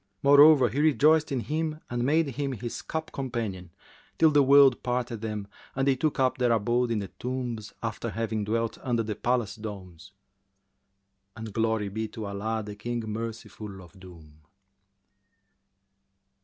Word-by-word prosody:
Moreover, 140 Hz, -2 st, +7 dB
he 130 Hz, +7 st, -3 dB
rejoiced 155 Hz, +1 st, +4 dB
in 130 Hz, -3 st, -1 dB
him 155 Hz, +3 st, -2 dB
and 120 Hz, 0 st, -2 dB
made 150 Hz, +3 st, +2 dB
him 135 Hz, +1 st, -3 dB
his 120 Hz, 0 st, -5 dB
cup 160 Hz, 0 st, -5 dB
companion, 115 Hz, -9 st, -4 dB, 0.5 s
till 160 Hz, -1 st, +5 dB
the 145 Hz, -1 st, +5 dB
world 140 Hz, -1 st, +6 dB
parted 125 Hz, -2 st, -2 dB
them 105 Hz, -2 st, -4 dB, 0.3 s
and 135 Hz, 0 st, 0 dB
they 135 Hz, -, +4 dB
took 150 Hz, +2 st, -1 dB
up 130 Hz, -1 st, +1 dB
their 125 Hz, -1 st, +2 dB
abode 120 Hz, +2 st, +1 dB
in 115 Hz, -, 0 dB
the 100 Hz, -2 st, -4 dB
tombs, 125 Hz, -4 st, -5 dB
after 115 Hz, +1 st, -3 dB
having 110 Hz, 0 st, -2 dB
dwelt 115 Hz, +1 st, -2 dB
under 120 Hz, -3 st, 0 dB
the 110 Hz, 0 st, -3 dB
palace 120 Hz, -2 st, 0 dB
domes; 100 Hz, -6 st, -9 dB, 1.2 s
and 110 Hz, -2 st, -8 dB
glory 110 Hz, -2 st, 0 dB
be 110 Hz, +2 st, -3 dB
to 110 Hz, 0 st, -7 dB
Allah, 110 Hz, +2 st, -3 dB
the 105 Hz, -1 st, -7 dB
King 120 Hz, +3 st, -4 dB
Merciful 110 Hz, -2 st, -6 dB
of 90 Hz, +1 st, -15 dB
doom. 80 Hz, -5 st, -15 dB
115 Hz, 155 wpm, -27 LUFS, 105-135 Hz, 1.2 s, Moreover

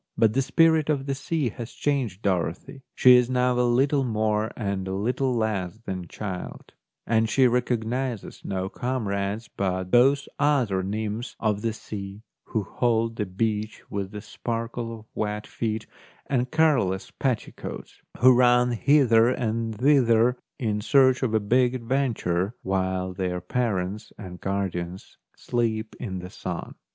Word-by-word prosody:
But 110 Hz, -1 st, +4 dB
the 135 Hz, -, +2 dB
spirit 160 Hz, +2 st, +3 dB
of 140 Hz, -3 st, 0 dB
the 140 Hz, -, -1 dB
sea 140 Hz, 0 st, -1 dB
has 115 Hz, +2 st, -8 dB
changed 125 Hz, -9 st, -1 dB
Dorothy; 95 Hz, +6 st, -2 dB
she 125 Hz, -1 st, +8 dB
is 125 Hz, 0 st, +2 dB
now 125 Hz, 0 st, +2 dB
a 125 Hz, 0 st, +3 dB
little 135 Hz, +3 st, +3 dB
more 110 Hz, -2 st, 0 dB
and 100 Hz, -4 st, -2 dB
a 95 Hz, -, -2 dB
little 125 Hz, +6 st, 0 dB
less 110 Hz, -4 st, -1 dB
than 90 Hz, -2 st, -4 dB
child; 95 Hz, 0 st, -7 dB, 0.3 s
and 110 Hz, 0 st, +2 dB
she 130 Hz, +4 st, +4 dB
recognises 120 Hz, -1 st, -1 dB
no 95 Hz, -1 st, -2 dB
comrades 105 Hz, -2 st, -2 dB
but 95 Hz, -2 st, -2 dB
those 135 Hz, +3 st, +4 dB
other 130 Hz, -10 st, +2 dB
nymphs 110 Hz, +4 st, -3 dB
of 105 Hz, -2 st, 0 dB
the 115 Hz, 0 st, 0 dB
sea, 100 Hz, -1 st, -8 dB, 0.2 s
who 110 Hz, -, -2 dB
hold 115 Hz, 0 st, 0 dB
the 105 Hz, -, -1 dB
beach 105 Hz, +2 st, -2 dB
with 100 Hz, -2 st, -3 dB
the 105 Hz, 0 st, -7 dB
sparkle 115 Hz, 0 st, -4 dB
of -, -, -20 dB
wet 105 Hz, 0 st, -3 dB
feet 110 Hz, -1 st, -3 dB, 0.4 s
and 125 Hz, -2 st, 0 dB
careless 130 Hz, -, +2 dB
petticoats, 130 Hz, -5 st, -4 dB, 0.2 s
who 130 Hz, +2 st, +7 dB
run 125 Hz, 0 st, +4 dB
hither 120 Hz, -2 st, +4 dB
and 115 Hz, -2 st, -1 dB
thither 125 Hz, -2 st, +4 dB, 0.2 s
in 105 Hz, -5 st, -1 dB
search 130 Hz, +2 st, +4 dB
of 130 Hz, -4 st, 0 dB
the 110 Hz, -, +4 dB
big 125 Hz, +4 st, +2 dB
adventure, 115 Hz, -6 st, -1 dB
while 95 Hz, -1 st, -1 dB
their 90 Hz, -1 st, -2 dB
parents 105 Hz, 0 st, -2 dB
and 90 Hz, -3 st, -9 dB
guardians 95 Hz, -2 st, -4 dB, 0.2 s
sleep 110 Hz, -2 st, -2 dB
in 95 Hz, -6 st, -4 dB
the 90 Hz, +1 st, -7 dB
sun. 90 Hz, -5 st, -5 dB
110 Hz, 145 wpm, -25 LUFS, 100-125 Hz, 0.4 s, she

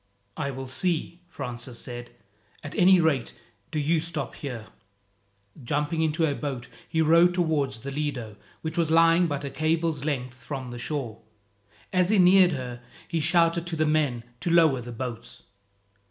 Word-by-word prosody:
"I 140 Hz, -2 st, -2 dB
will 135 Hz, 0 st, -5 dB
see," 170 Hz, +5 st, -2 dB
Francis 125 Hz, -6 st, -6 dB
said. 120 Hz, 0 st, -7 dB, 0.5 s
"At 145 Hz, -, -7 dB
any 185 Hz, +1 st, +6 dB
rate, 150 Hz, -8 st, +1 dB, 0.3 s
do -, -, -4 dB
you 155 Hz, +2 st, +2 dB
stop 155 Hz, -3 st, -4 dB
here." 125 Hz, -6 st, -6 dB, 1.0 s
Jumping 150 Hz, +5 st, -1 dB
into 160 Hz, +1 st, +2 dB
a 145 Hz, -, +1 dB
boat, 135 Hz, -4 st, -4 dB, 0.2 s
he 160 Hz, 0 st, +2 dB
rowed 170 Hz, +3 st, +5 dB
towards 145 Hz, -, 0 dB
the 140 Hz, -, -5 dB
Lido, 135 Hz, -7 st, -3 dB, 0.3 s
which 160 Hz, +1 st, -3 dB
was 165 Hz, -2 st, +2 dB
lying 165 Hz, +2 st, +5 dB
but 145 Hz, -2 st, -3 dB
a 140 Hz, -, -5 dB
cable's 160 Hz, -1 st, 0 dB
length 130 Hz, -4 st, -3 dB
from 130 Hz, -4 st, -5 dB
the 120 Hz, -, -7 dB
shore. 120 Hz, -5 st, -4 dB, 0.7 s
As 180 Hz, 0 st, +3 dB
he 215 Hz, -, +4 dB
neared 180 Hz, -1 st, +6 dB
her, 125 Hz, -3 st, -5 dB, 0.3 s
he 165 Hz, -, -1 dB
shouted 170 Hz, +1 st, +2 dB
to 170 Hz, -, -2 dB
the 155 Hz, 0 st, +1 dB
men 150 Hz, -6 st, +1 dB, 0.2 s
to 175 Hz, -, -2 dB
lower 160 Hz, -6 st, +4 dB
the 120 Hz, +1 st, -8 dB
boats. 120 Hz, -1 st, -7 dB
150 Hz, 165 wpm, -26 LUFS, 130-165 Hz, 1.0 s, any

